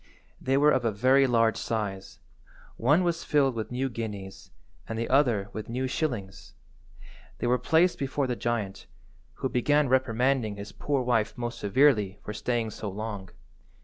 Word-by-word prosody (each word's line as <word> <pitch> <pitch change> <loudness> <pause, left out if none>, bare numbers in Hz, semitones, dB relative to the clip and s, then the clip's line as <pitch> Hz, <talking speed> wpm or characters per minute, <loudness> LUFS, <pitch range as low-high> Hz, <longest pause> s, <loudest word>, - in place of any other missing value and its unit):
They 135 +1 +1
were 150 +1 +5
of 130 -4 +1
a 115 - +1
very 130 +6 +4
large 115 -2 +3
size. 100 -4 -4 0.6
One 150 +10 +3
was 170 -1 -1
filled 140 -3 +2
with 110 -2 -4
new 130 +2 -1
guineas, 105 -6 -7 0.4
and 115 - -3
the 115 0 -2
other 120 -8 +2
with 110 0 -6
new 125 +3 -2
shillings. 125 -9 -4 0.8
They - - -3
were 125 +1 +2
placed 170 +3 +3
before 135 +1 -1
the 125 -1 -1
giant, 115 -5 -3 0.5
who - - -2
began 145 +3 +2
reprimanding 130 -3 +1
his 100 +1 -8
poor 140 -3 -1
wife 115 -3 0
most 120 -1 -4
severely 105 -3 +3
for 105 - -5
staying 115 0 -1
so 105 - -5
long. 100 -1 -6
120 Hz, 160 wpm, -27 LUFS, 105-135 Hz, 0.8 s, were